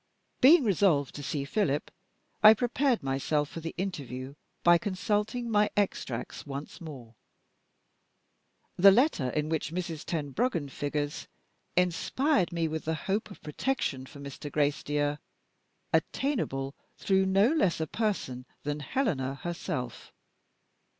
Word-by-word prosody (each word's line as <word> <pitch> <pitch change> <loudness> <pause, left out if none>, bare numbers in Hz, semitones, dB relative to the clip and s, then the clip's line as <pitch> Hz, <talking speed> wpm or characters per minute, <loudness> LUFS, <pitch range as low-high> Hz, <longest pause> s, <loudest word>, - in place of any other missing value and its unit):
Being 290 +4 +8
resolved 180 - +2
to 145 - -7
see 140 0 -2
Philip, 150 -4 0 0.5
I 215 +1 +10
prepared 245 - +1
myself 140 +2 0
for - - -7
the 165 0 -6
interview 140 -8 -4 0.3
by 175 0 +6
consulting 210 +5 -1
my 210 -2 +3
extracts 135 - -2
once 145 +5 -7
more. 130 -8 -9 1.6
The 195 +3 +9
letter, 195 - +3
in 150 +4 -1
which 160 -1 -2
Mrs. 170 -3 -4
Tenbruggen 160 - -1
figures, 145 +2 -3 0.5
inspired 180 - +2
me 165 -1 0
with 160 0 -4
the 160 +1 0
hope 200 +8 -2
of 200 - -13
protection 150 - -2
for 140 - -12
Mr. 140 +1 -7
Gracedieu, 145 0 0 0.7
attainable 140 - 0 0.2
through 190 -1 +2
no 195 +4 +4
less 195 - +2
a 160 - 0
person 150 - -2 0.2
than 145 +1 -2
Helena 150 - -1
herself. 135 -6 -5
165 Hz, 125 wpm, -29 LUFS, 145-205 Hz, 1.6 s, I